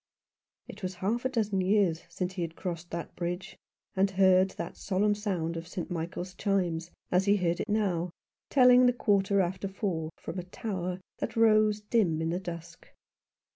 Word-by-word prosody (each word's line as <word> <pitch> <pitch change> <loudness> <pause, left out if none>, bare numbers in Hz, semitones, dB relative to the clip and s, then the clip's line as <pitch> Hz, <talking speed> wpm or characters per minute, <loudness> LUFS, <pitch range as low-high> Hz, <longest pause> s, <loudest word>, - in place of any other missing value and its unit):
It 205 - -10
was 185 -1 -3
half 215 +7 -1
a - - +3
dozen 210 -6 0
years 185 -4 +2
since 180 +2 -3
he 185 - -4
had 165 -1 -3
crossed 170 -2 -5
the 170 0 -4
bridge, 175 +2 -4 0.4
and 195 +1 +3
heard 190 0 +4
that - - -6
solemn 205 +1 +1
sound 185 -6 -2
of 165 0 -6
St. 180 0 -5
Michael's 175 +2 -4
chimes, 175 -4 -1 0.2
as 180 +1 +3
he 200 0 +5
heard 175 -2 0
it 215 - -3
now, 190 -5 +1 0.4
telling 250 -2 +7
the 245 - +4
quarter 200 -3 +2
after 185 +2 -2
four 185 -5 -2
from 185 - -6
a - - -4
tower 185 -2 -4 0.2
that - - -3
rose 215 -2 +4
dim 205 -7 +1
in 160 0 -1
the 175 - -1
dusk. 170 -3 -8
190 Hz, 175 wpm, -29 LUFS, 175-205 Hz, 0.4 s, telling